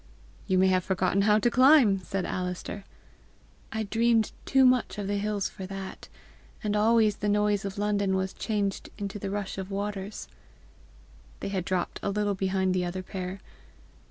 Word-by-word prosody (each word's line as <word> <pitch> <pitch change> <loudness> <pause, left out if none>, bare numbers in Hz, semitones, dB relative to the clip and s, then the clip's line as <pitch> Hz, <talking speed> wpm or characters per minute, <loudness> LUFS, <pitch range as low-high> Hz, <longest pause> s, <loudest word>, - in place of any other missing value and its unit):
"You 190 -2 +2
may 185 - +5
have 185 -1 +2
forgotten 190 +1 +1
how 210 +1 +4
to 235 +3 +2
climb!" 255 -6 +6
said 190 0 -3
Alister. 180 +2 -4 0.9
"I 220 0 -2
dreamed 225 +1 +2
too 270 -1 +4
much 250 -4 +3
of 205 - -3
the 200 +1 -1
hills 205 -1 -1
for 190 - -8
that! 195 0 -7 0.5
And 210 -1 0
always 215 -1 +3
the 210 - -1
noise 205 -1 +2
of 200 +1 -5
London 200 -2 +1
was 190 0 -1
changed 205 -3 -2
into 205 0 -5
the 200 - -4
rush 200 -1 -4
of 190 0 -5
waters." 200 0 -4 1.1
They - - -4
had 190 -3 -2
dropped 185 -2 -2
a - - -1
little 205 0 0
behind 190 -1 0
the 180 -1 0
other 180 +1 -4
pair. 185 0 -6
200 Hz, 170 wpm, -28 LUFS, 190-210 Hz, 1.1 s, climb